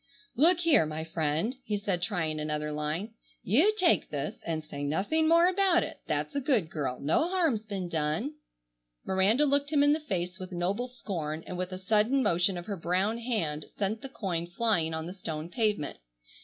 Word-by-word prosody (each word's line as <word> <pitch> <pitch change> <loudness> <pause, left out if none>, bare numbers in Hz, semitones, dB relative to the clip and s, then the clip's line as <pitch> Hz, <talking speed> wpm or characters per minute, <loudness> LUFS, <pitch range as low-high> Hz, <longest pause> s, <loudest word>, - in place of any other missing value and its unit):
"Look 335 +6 +5
here, 315 - +4
my 155 +1 -4
friend," 160 - -1
he 210 -4 -1
said 200 -3 -1
trying 170 -5 -1
another 150 0 -2
line, 155 +9 -3 0.3
"you 295 - +4
take 360 -4 +3
this - - -4
and 160 -1 -2
say 145 -2 -8
nothing 205 - +1
more 335 +1 +6
about 370 -2 +3
it. - - -7
That's - - -1
a 280 - -1
good 235 - +1
girl. 135 -5 -3
No 160 - +1
harm's 315 - +1
been 195 -4 -3
done." 160 - -1 0.7
Miranda 200 +9 +3
looked 285 0 +2
him 290 -2 +4
in 290 0 +5
the 310 - 0
face 185 - -3
with 185 0 -7
noble 190 +7 -1
scorn, 165 -10 -5
and 180 - -6
with 180 +1 -3
a 185 - -4
sudden 215 +8 +2
motion 175 0 +2
of 175 - -6
her 200 -1 -4
brown 185 +7 0
hand 195 -11 -2
sent 210 +2 -1
the 270 - -7
coin 175 -8 -3
flying 175 -4 +1
on 160 0 -4
the 175 - -6
stone 160 -4 -5
pavement. 210 - -1
190 Hz, 190 wpm, -29 LUFS, 160-250 Hz, 0.7 s, more